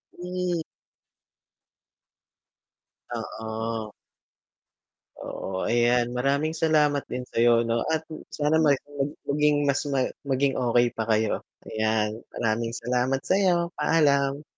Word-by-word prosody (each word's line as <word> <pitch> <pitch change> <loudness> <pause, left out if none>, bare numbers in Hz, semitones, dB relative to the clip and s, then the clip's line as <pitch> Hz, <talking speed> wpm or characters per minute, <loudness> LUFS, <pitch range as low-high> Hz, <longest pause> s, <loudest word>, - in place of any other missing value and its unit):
Hmm. 180 -1 -2 2.6
Oo. 110 0 -4 1.2
Oo, 95 -1 -5
ayan, 120 +1 +2
maraming 140 +5 0
salamat 150 -3 +2
din 125 0 -4
sa'yo, 115 0 +4
'no, 115 0 0
at 160 0 0 0.2
sana 150 +1 +1
ma 150 -2 +5 0.6
maging 145 0 +2
mas 140 0 +2
ma 135 -2 +1 0.2
maging 135 +1 +2
okey 120 -1 +3
pa 110 - -2
kayo. 110 0 +1 0.3
Ayan, 110 0 0
maraming 115 +1 -1
salamat 125 +3 0
sa'yo, 180 -3 +2
paalam. 145 -2 +2
130 Hz, 100 wpm, -26 LUFS, 115-150 Hz, 2.6 s, ma